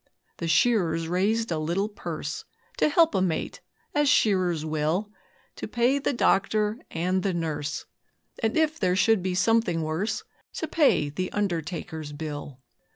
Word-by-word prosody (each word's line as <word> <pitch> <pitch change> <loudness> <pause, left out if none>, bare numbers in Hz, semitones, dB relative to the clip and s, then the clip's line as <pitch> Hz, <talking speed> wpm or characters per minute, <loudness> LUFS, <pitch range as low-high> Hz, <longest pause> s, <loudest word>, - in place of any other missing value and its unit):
The 170 - -3
shearers 165 -3 +2
raised 205 +6 +1
a 160 - 0
little 170 +6 0
purse 170 -8 -5 0.3
To - - +3
help 330 +2 +4
a 190 - +2
mate, 170 -4 -2 0.3
as 295 -1 +3
shearers 185 - +2
will, 155 +7 -1 0.5
'To - - -5
pay 245 +4 +2
the 280 - 0
doctor 215 -2 +2
and 180 +3 0
the 190 -1 -1
nurse, 150 -3 -3 0.6
And 225 +3 +1
if 315 0 +2
there 180 -2 +2
should 220 +1 +3
be 185 0 -1
something 185 -4 +2
worse 190 +8 -2 0.3
To 320 - -3
pay 285 - +3
the 185 +6 -3
undertaker's 165 -5 -3
bill.' 145 -3 -6
185 Hz, 150 wpm, -26 LUFS, 160-220 Hz, 0.6 s, help